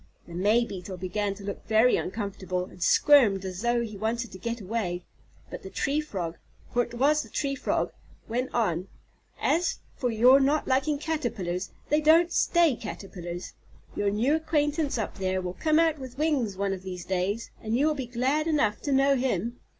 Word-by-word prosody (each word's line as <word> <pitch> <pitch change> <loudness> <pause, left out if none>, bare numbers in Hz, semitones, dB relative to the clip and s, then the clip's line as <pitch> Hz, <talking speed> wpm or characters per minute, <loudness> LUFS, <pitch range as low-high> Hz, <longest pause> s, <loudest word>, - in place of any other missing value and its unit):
The 170 - -12
May 210 +7 +3
Beetle 185 -2 -7
began 195 +2 -2
to 200 - -11
look 200 0 -5
very 220 +3 +5
uncomfortable, 190 -3 -3
and 180 - -15
squirmed 220 - +5
as 185 0 -5
though 240 0 +2
he 215 -2 -6
wanted 230 +3 -2
to 185 - -10
get 235 +4 -3
away, 185 -4 -3 0.5
but - - -6
the 190 - -8
Tree 285 +9 0
Frog, 180 - -5 0.4
for 245 - +3
it 240 0 -5
was 295 +5 +3
the - - -11
Tree 280 -2 -1
Frog, 275 - -1 0.4
went 250 +3 -2
on: 185 -6 0 0.5
"As 345 +2 +1 0.2
for 250 - -1
your 245 +4 +6
not 285 +3 +2
liking 270 +3 +2
Caterpillars, 225 - -2 0.2
they 300 +1 +3
don't 330 +3 +5
stay 340 -6 +3
Caterpillars. 180 -5 -7 0.4
Your 205 - +1
new 225 +8 +1
acquaintance 305 -2 0
up 220 -3 -4
there 185 0 0
will 180 -1 -4
come 310 - +1
out 325 -2 +3
with 260 -1 -9
wings 275 -10 0
one 200 0 0
of 190 - -6
these 180 -2 -7
days, 190 +4 -2
and 225 +1 -1
you 280 - +3
will 310 - +3
be 265 -4 -5
glad 265 +6 0
enough 250 -10 +1
to 285 - -2
know 275 +1 +4
him." 240 -3 -1
235 Hz, 190 wpm, -27 LUFS, 195-280 Hz, 0.5 s, your